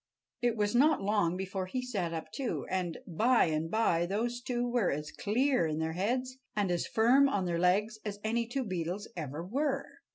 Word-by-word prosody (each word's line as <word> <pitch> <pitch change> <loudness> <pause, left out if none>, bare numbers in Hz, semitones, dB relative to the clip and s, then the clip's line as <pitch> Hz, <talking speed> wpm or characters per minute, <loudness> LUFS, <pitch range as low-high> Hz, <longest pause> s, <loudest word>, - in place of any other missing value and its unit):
It 240 -2 +1
was 210 0 +1
not 275 0 +4
long 195 -4 +1
before 190 0 -3
he 255 - -2
sat 200 -9 -2
up, 165 -1 -5
too; 265 -4 -3
and 180 -3 -1
by 230 +8 +3
and 160 0 -1
by 175 -5 +2
those 235 +5 -1
two 245 -1 -1
were 240 -5 +1
as 150 +1 -3
clear 245 - +1
in 155 -1 -2
their 160 0 -1
heads 255 +8 -1 0.2
and 205 -3 +1
as 175 - 0
firm 255 +5 +5
on 200 -8 0
their 170 -1 -1
legs 205 +5 +2
as 205 -1 -5
any 230 +1 0
two 260 +3 -2
beetles 185 -1 -3
ever 155 0 -5
were. 275 +6 -1
205 Hz, 195 wpm, -31 LUFS, 175-245 Hz, 0.2 s, firm